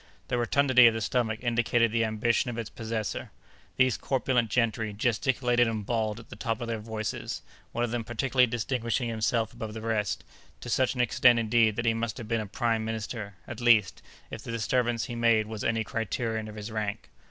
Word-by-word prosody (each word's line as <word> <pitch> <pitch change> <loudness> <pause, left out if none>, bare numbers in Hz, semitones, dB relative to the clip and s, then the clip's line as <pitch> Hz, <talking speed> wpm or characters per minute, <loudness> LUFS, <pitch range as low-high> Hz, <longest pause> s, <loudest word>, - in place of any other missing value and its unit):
The 125 - 0
rotundity 125 0 +5
of 115 - +3
the - - -1
stomach 110 0 -1
indicated 120 -1 +2
the 115 0 +2
ambition 110 +3 +1
of 120 - -5
its 115 -2 -5
possessor. 110 -2 -4 0.5
These 130 -2 +3
corpulent 125 -3 0
gentry 110 -3 0
gesticulated 120 +2 +2
and 110 -2 -3
bawled 110 -1 -1
at 115 - -14
the - - -9
top 115 -3 -2
of 120 - -4
their 115 -1 -2
voices—one 110 +2 -5
of 120 - -1
them 120 -1 -1
particularly 125 +3 +2
distinguishing 120 +1 -1
himself 110 0 0
above 110 -1 -6
the 110 - -5
rest—to 110 +1 -4
such 130 +1 +2
an 125 - +1
extent, 125 0 +5
indeed, 115 -1 +3
that 115 - -2
he 115 - +3
must 115 +1 -3
have 120 -4 -7
been 115 0 0
a 105 - -6
prime 115 +1 0
minister—at 110 -1 -6
least, 115 -6 +4 0.3
if - - -6
the - - -10
disturbance 115 0 0
he 125 - -6
made 115 -2 +3
was 110 -1 -6
any 115 0 +1
criterion 110 -1 -2
of 105 - -9
his 105 +1 -6
rank. 105 -2 -4
115 Hz, 190 wpm, -28 LUFS, 110-120 Hz, 0.5 s, rotundity